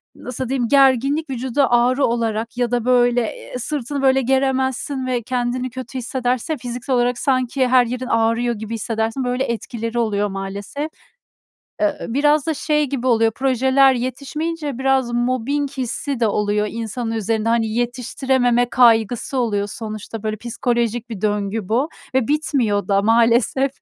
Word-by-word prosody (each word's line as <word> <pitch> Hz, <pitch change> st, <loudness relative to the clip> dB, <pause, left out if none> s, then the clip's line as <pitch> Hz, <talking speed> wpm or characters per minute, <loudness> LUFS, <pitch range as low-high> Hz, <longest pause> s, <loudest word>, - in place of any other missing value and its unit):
nasıl 250 Hz, 0 st, -5 dB
diyeyim? 255 Hz, -3 st, 0 dB
Gerginlik 275 Hz, +3 st, +3 dB
vücuda 260 Hz, +1 st, 0 dB
ağrı 250 Hz, +3 st, +3 dB
olarak 230 Hz, 0 st, -2 dB
ya 245 Hz, -1 st, 0 dB
da 240 Hz, -1 st, 0 dB
böyle, 245 Hz, -1 st, +3 dB
eee, 230 Hz, +2 st, -6 dB
sırtını 280 Hz, +1 st, -3 dB
böyle 265 Hz, 0 st, +4 dB
geremezsin 265 Hz, +1 st, 0 dB
ve 245 Hz, -2 st, 0 dB
kendini 250 Hz, +1 st, -2 dB
kötü 260 Hz, +1 st, -7 dB
hissedersin 250 Hz, +3 st, -1 dB
ya, -, -, -4 dB
fiziksel 245 Hz, +1 st, -3 dB
olarak 245 Hz, 0 st, +1 dB
sanki 255 Hz, -1 st, +1 dB
her 250 Hz, -1 st, +5 dB
yerin 250 Hz, +2 st, -4 dB
ağrıyor 230 Hz, +1 st, +1 dB
gibi 220 Hz, +2 st, -6 dB
hissedersin 225 Hz, +3 st, -2 dB
böyle 250 Hz, +1 st, 0 dB
etkileri 235 Hz, -1 st, -3 dB
oluyor 205 Hz, -2 st, 0 dB
maalesef. 200 Hz, +10 st, -5 dB, 0.9 s
Eee, 310 Hz, -2 st, +2 dB
ııı, 235 Hz, -, -5 dB
biraz 295 Hz, +1 st, +3 dB
da 320 Hz, -, 0 dB
şey 300 Hz, +1 st, +1 dB
gibi 260 Hz, -1 st, -3 dB
oluyor 225 Hz, -2 st, +3 dB
projeler 265 Hz, +1 st, +3 dB
yetişmeyince 280 Hz, +3 st, -3 dB
biraz 265 Hz, -2 st, +1 dB
mobbing 255 Hz, +4 st, 0 dB
hissi 260 Hz, 0 st, -3 dB
de 225 Hz, -, +3 dB
oluyor 210 Hz, 0 st, 0 dB
insanın 230 Hz, +1 st, -4 dB
üzerinde. 225 Hz, 0 st, -1 dB
Hani, 230 Hz, -1 st, +2 dB
yetiştirememe 245 Hz, +1 st, 0 dB
kaygısı 240 Hz, +1 st, +3 dB
oluyor 205 Hz, -4 st, 0 dB
sonuçta, 215 Hz, 0 st, -7 dB
böyle 215 Hz, 0 st, -2 dB
psikolojik 235 Hz, 0 st, -2 dB
bir 205 Hz, -4 st, -6 dB
döngü 205 Hz, -1 st, -1 dB
bu 255 Hz, +8 st, +1 dB, 0.3 s
ve 260 Hz, -1 st, +1 dB
bitmiyor 255 Hz, -10 st, 0 dB
da 200 Hz, 0 st, +3 dB
maalesef. 235 Hz, +4 st, +3 dB
245 Hz, 150 wpm, -20 LUFS, 225-265 Hz, 0.9 s, her